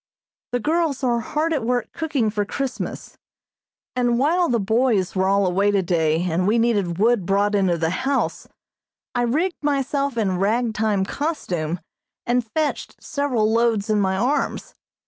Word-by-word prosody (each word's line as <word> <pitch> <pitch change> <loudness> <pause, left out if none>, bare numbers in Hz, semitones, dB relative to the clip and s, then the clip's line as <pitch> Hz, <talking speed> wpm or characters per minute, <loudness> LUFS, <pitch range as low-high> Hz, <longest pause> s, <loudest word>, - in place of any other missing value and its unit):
The 245 - 0
girls 310 -1 0
are 240 -2 +2
hard 310 +7 -1
at 280 -6 -1
work 245 0 -1
cooking 285 -9 -1
for 205 -1 0
Christmas, 265 +5 -5 0.8
and 245 -1 +2
while 335 +7 +2
the 235 -2 +2
boys 220 -2 +1
were 190 0 +2
all 200 0 +3
away 195 +3 +2
today 170 -5 +1
and 180 +1 0
we 220 +3 +3
needed 205 -7 +1
wood 225 0 +3
brought 200 +3 +1
into 190 -4 +2
the 165 0 0
house, 265 +8 -1 0.7
I 245 - 0
rigged 310 +10 0
myself 280 -2 0
in 190 -5 0
rag 225 +4 +1
time 210 -3 +1
costume 180 - -3 0.5
and 245 +1 +1
fetched 310 -2 -1
several 250 -7 0
loads 225 -2 +1
in 210 -1 +2
my 190 -1 +1
arms. 250 +8 -1
230 Hz, 155 wpm, -22 LUFS, 195-270 Hz, 0.8 s, all